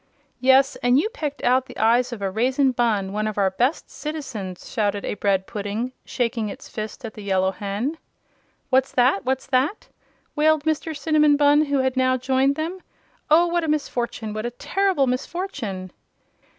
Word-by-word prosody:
"Yes, 265 +2 +4
and 245 +1 +3
you 395 +10 +2
pecked 300 - -5
out 255 +1 +3
the - - -11
eyes 240 +3 +3
of 220 -4 -6
a 195 - -1
Raisin 260 +6 +2
Bunn 215 -6 0
one 215 +1 -1
of 215 - -4
our 195 -2 +2
best 250 - -1
citizens!" 240 - -6
shouted 205 -3 -1
a - - -2
bread 195 -2 0
pudding, 210 +5 -4
shaking 230 -3 -1
its - - -9
fist 215 +2 -6
at 220 - -7
the 215 - -10
Yellow 190 -1 +1
Hen. 210 - -3 0.7
"What's 260 +1 +3
that! 245 -5 +3
What's 265 0 -1
that?" 270 +9 0 0.5
wailed 310 0 +3
Mr. 315 0 -1
Cinnamon 300 0 +3
Bunn, 295 +1 +5
who 285 -1 0
had 260 0 0
now 255 0 +2
joined 265 +2 +1
them. 330 +5 -3 0.5
"Oh, 325 +3 +6
what 345 0 0
a - - -2
misfortune 240 -7 -2
what 215 0 -4
a - - -2
terrible 370 +5 0
misfortune!" 250 - -4
255 Hz, 175 wpm, -23 LUFS, 215-290 Hz, 0.7 s, Oh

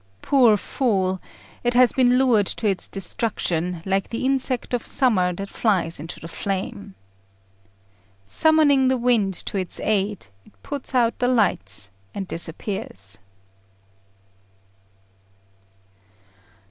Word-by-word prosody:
Poor 245 -7 +5
fool! 190 -6 -1 0.4
it 240 0 +2
has 250 -1 +6
been 250 -2 +4
lured 240 -7 +3
to 230 - -3
its 195 -2 -1
destruction, 180 -4 -2
like 195 0 0
the 230 +2 -3
insect 260 -2 0
of 245 - -2
summer 205 -9 +3
that 195 +3 -6
flies 185 -8 0
into 160 +3 -8
the 165 - -9
flame. 175 - -5 1.3
Summoning 290 - +4
the 260 0 +2
winds 230 -6 +1
to - - -4
its 185 -2 -3
aid, 205 -2 0 0.2
it 100 0 -24
puts 280 -2 -5
out 235 -2 +2
the 245 - +2
lights, 100 - +1 0.2
and 195 -2 -4
disappears. 165 - -4
205 Hz, 115 wpm, -23 LUFS, 180-250 Hz, 1.3 s, has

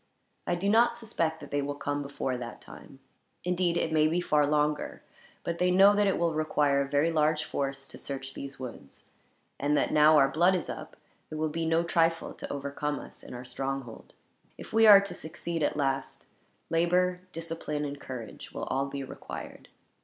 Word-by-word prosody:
I 175 - +1
do 180 +3 -2
not 235 +3 +4
suspect 165 -9 -2
that - - -10
they 145 - +1
will 145 +1 -3
come 145 0 -2
before 140 -2 -3
that 120 -2 -7
time. - - -13 0.5
Indeed, 180 -1 +1
it 160 - 0
may 155 -1 +4
be 165 +3 +1
far 150 -4 +2
longer, 150 0 0 0.4
for 170 - -1
they 180 +2 +1
know 195 +3 +7
that 205 0 +3
it 195 - +2
will 170 -1 +1
require 150 -2 +2
a 135 - -3
very 145 +4 +2
large 155 0 +2
force 135 -2 -3
to - - -9
search 135 -1 -5
these 140 0 -7
woods; 115 - -9 0.5
and 145 +1 +2
that, - - +1
now 155 +1 +7
our 135 -2 +6
blood 175 +6 +3
is 175 - -3
up, - - -9 0.3
it - - -6
will 155 0 -1
be 165 +1 -2
no 165 +1 +3
trifle 165 -1 +1
to - - -7
overcome 140 +1 -3
us - - -11
in - - -9
our 125 +1 -8
stronghold. 135 -1 -5 0.4
If - - -10
we 225 0 +6
are 200 -2 +10
to 200 -2 -5
succeed 165 0 -5
at 145 - 0
last, 135 -2 -2 0.5
labor, 180 +2 +2
discipline, 160 -3 -4
and 145 0 -6
courage 120 -5 -8
will - - -5
all 135 +1 -1
be 140 0 -5
required." 130 - -9
150 Hz, 195 wpm, -29 LUFS, 140-170 Hz, 0.5 s, are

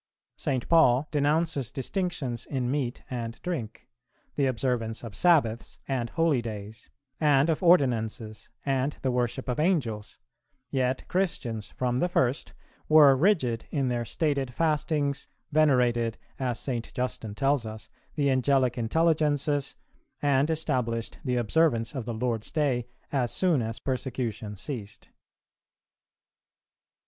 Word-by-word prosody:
St. 130 -3 -2
Paul 155 -4 +5
denounces 150 -2 +1
distinctions 135 - -3
in 130 -3 -1
meat 135 -4 -2
and 115 -2 -4
drink, 135 -12 -4 0.5
the 140 -2 +1
observance 120 -3 -1
of 115 -3 -7
Sabbaths 140 -11 +2
and 125 -4 -1
holydays, 115 -10 -1 0.3
and 150 0 +4
of 155 - -2
ordinances, 115 - +2 0.2
and 135 +1 0
the 130 - +1
worship 125 +1 -1
of 125 +1 -1
Angels; 135 - 0 0.5
yet 130 -1 0
Christians, 125 - -2
from 125 -1 0
the 175 - +1
first, 130 -5 0 0.4
were 150 -3 +8
rigid 130 - +2
in 135 -3 0
their 120 -1 -1
stated 140 0 -1
fastings, 150 -3 0 0.2
venerated, 125 -7 +3 0.2
as 125 -3 -1
St. 120 -4 -3
Justin 125 -5 -3
tells 135 0 +2
us, 110 0 -8 0.3
the 140 -2 +2
Angelic 130 -1 +2
intelligences,[369:1] 145 +1 +1 0.5
and 140 +1 +3
established 125 -8 -1
the 125 -2 0
observance 120 -1 +2
of 130 -5 -4
the 120 - -3
Lord's 115 -1 -2
day 130 -6 0 0.2
as 130 -4 +1
soon 175 -8 +2
as 110 0 -3
persecution 120 -5 -3
ceased. 105 -1 -7
130 Hz, 120 wpm, -27 LUFS, 120-150 Hz, 0.5 s, were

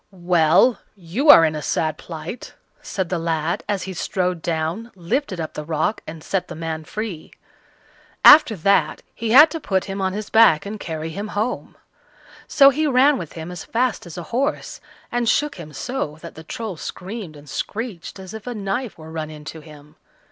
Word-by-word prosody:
"Well! 175 +4 +3 0.2
you 200 - -1
are 165 - +10
in 155 - 0
a 150 - -4
sad 155 +2 -1
plight," 165 +7 -8 0.3
said 190 -3 -3
the 180 - -1
lad, 165 0 -1
as 200 -2 -1
he 190 - -5
strode 180 -1 -2
down, 170 +8 -2
lifted 190 - -2
up 160 - -4
the 150 - -5
rock, 160 +7 -1
and 160 -1 -8
set 195 -2 -2
the 175 - -8
man 160 -1 -5
free. 210 -6 -6 0.9
After 290 -7 +9
that 180 -3 +1
he 225 0 -4
had 290 +7 +8
to 325 - -4
put 190 -9 -1
him 195 0 -4
on 190 -1 0
his 210 +1 -6
back 220 -9 +5
and 210 +1 -6
carry 160 -2 -5
him 200 +6 -5
home; 225 +4 -3 0.7
so 275 -1 +6
he 305 +3 0
ran 275 0 +4
with 165 -4 -7
him 165 +1 -7
as 175 -2 -7
fast 235 -5 -1
as 170 - -9
a 175 - -5
horse, 275 +5 -2 0.3
and 240 -1 +1
shook 295 -5 +1
him 160 -3 -9
so 155 - -4
that - - -9
the 160 - -11
Troll 205 +2 -6
screamed 185 0 -7
and 145 0 -15
screeched 205 - -5
as 190 +1 -10
if 220 +1 -9
a 245 - -4
knife 210 +4 -3
were 160 0 -11
run 160 -1 -4
into 150 +1 -9
him. 150 -1 -15
185 Hz, 190 wpm, -22 LUFS, 160-225 Hz, 0.9 s, are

